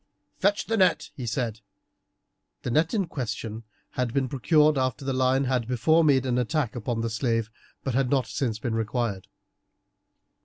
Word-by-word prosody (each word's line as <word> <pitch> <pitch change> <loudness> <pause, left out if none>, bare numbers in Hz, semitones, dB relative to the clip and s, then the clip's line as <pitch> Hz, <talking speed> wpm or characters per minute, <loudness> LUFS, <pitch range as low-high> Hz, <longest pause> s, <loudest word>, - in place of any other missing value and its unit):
"Fetch 200 +2 +2
the 225 - 0
net," 185 -3 +2
he 125 -3 -5
said. 115 -1 -2 1.0
The 125 - -2
net 155 +6 +2
in 200 -3 +1
question 115 -6 -5 0.3
had 125 -1 -2
been 135 -2 +2
procured 150 +4 +3
after 130 0 -1
the 135 - 0
lion 130 +1 +2
had 125 -3 0
before 125 +7 +3
made 135 -4 +4
an 125 -1 +1
attack 125 0 -1
upon 120 -1 -2
the 115 - -1
slave, 115 -1 0 0.3
but 135 - -2
had 130 0 +1
not 135 -3 +2
since 115 -2 -2
been 115 +1 -3
required. 110 -3 -2
125 Hz, 165 wpm, -26 LUFS, 115-140 Hz, 1.0 s, made